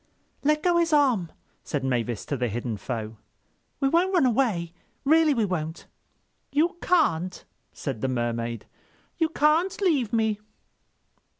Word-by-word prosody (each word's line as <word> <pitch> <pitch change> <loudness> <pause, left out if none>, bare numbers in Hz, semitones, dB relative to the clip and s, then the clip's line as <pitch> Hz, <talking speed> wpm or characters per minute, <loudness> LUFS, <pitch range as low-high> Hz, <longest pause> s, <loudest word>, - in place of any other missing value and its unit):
"Let 300 +1 +2
go 350 -1 +3
his 335 -2 +2
arm," 250 - +3 0.3
said 145 -3 -3
Mavis 120 -4 -1
to 145 - -2
the 125 -2 -1
hidden 115 +1 -3
foe. 110 -1 -5 0.6
"We 275 - +2
won't 345 +6 +2
run 330 -7 +4
away. 220 -10 +1 0.3
Really 310 0 +5
we 225 -3 +2
won't." 160 -4 -4 0.7
"You 325 +5 +1
can't," 185 - +1 0.3
said 130 -7 -5
the - - 0
Mermaid. 115 -2 -2 0.5
"You 325 -1 +2
can't 320 +4 +2
leave 295 - +1
me." 220 -2 +1
220 Hz, 135 wpm, -26 LUFS, -, 0.7 s, Really